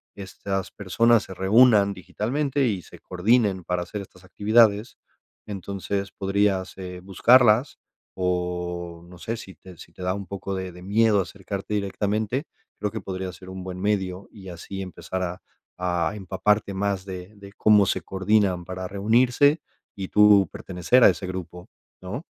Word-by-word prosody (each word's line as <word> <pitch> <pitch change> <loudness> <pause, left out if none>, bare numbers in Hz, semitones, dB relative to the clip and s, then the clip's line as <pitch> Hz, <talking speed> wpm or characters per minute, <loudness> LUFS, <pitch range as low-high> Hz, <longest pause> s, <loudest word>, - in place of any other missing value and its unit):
estas 95 0 -4
personas 115 +4 +3
se 95 - -10
reúnan 100 +1 +5
digitalmente 135 - -1
y 100 -5 -1
se - - -14
coordinen 100 0 +1
para 90 0 -2
hacer 105 +3 -6
estas 95 -1 -15
actividades, 105 +3 +3 0.5
entonces 100 0 -4
podrías, 95 -1 0
eh, 90 -1 -7
buscarlas, 115 +6 +4 0.4
o 90 -1 -3
no 90 0 -13
sé 115 +4 -4
si 110 -5 -10
te 90 -2 -15
si - - -14
te - - -13
da 90 +1 -1
un 100 -1 -6
poco 100 +1 -5
de 95 -1 -4
de 90 +1 -13
miedo 105 +1 +3
acercarte 100 +2 -5
directamente, 105 - -1 0.3
creo 105 - -1
que - - -5
podría 95 -1 -5
ser 95 +2 -13
un 95 0 -7
buen 90 0 -6
medio 95 -2 -1
y 95 -3 -11
así 95 +3 -7
empezar 95 0 -5
a 90 +1 -5 0.4
a 90 0 0
empaparte 100 +1 0
más 100 -1 -2
de 95 +2 -8
de 100 0 -13
cómo 105 -1 +5
se - - -1
coordinan 95 -2 +1
para 95 +1 -5
reunirse 125 - +3 0.3
y 95 -2 -5
tú 105 -2 +6
pertenecer 95 +7 +1
a - - +9
ese 95 - -3
grupo, 90 -1 -7 0.3
¿no? 100 - -6
95 Hz, 160 wpm, -24 LUFS, 90-105 Hz, 0.5 s, a